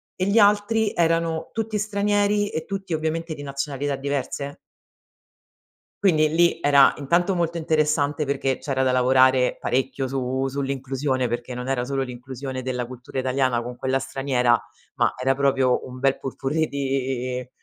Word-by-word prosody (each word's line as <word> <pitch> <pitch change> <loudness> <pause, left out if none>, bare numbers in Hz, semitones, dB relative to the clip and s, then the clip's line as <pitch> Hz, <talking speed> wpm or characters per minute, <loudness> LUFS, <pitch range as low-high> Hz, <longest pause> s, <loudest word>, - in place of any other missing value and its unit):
e 185 - -1
gli 200 +3 +3
altri 210 +1 +3
erano 165 -1 +1
tutti 225 -1 -2
stranieri 205 0 +1
e 160 - -4
tutti, 195 -3 -4
ovviamente, 160 +1 -2
di 145 - -8
nazionalità 140 0 -3
diverse 140 +1 -3 1.5
quindi 155 -6 +4
lì, 170 +2 +3
era 140 -1 +6
intanto, 170 +7 +1
molto 170 -1 -1
interessante. 155 -2 +1
Perché, 135 -1 -1
c'era 135 -2 -1
da 130 - +2
lavorare 130 0 +4
parecchio 130 +1 -1
su 130 0 -1
sull'inclusione. 135 -1 -2
Perché 120 +2 -4
non 125 +1 -5
era 135 -2 0
solo 135 +1 -1
l'inclusione 130 +1 -6
della 125 -1 -3
cultura 125 +2 -7
italiana 130 -2 +1
con 125 +1 -6
quella 130 +2 0
straniera, 125 -4 +1 0.4
ma 120 - +2
era 135 +1 +2
proprio 135 -2 +2
un 130 0 -9
bel 135 +1 +1
pot-pourri 140 +4 -2
di 130 -2 -2
135 Hz, 145 wpm, -23 LUFS, 130-160 Hz, 1.5 s, era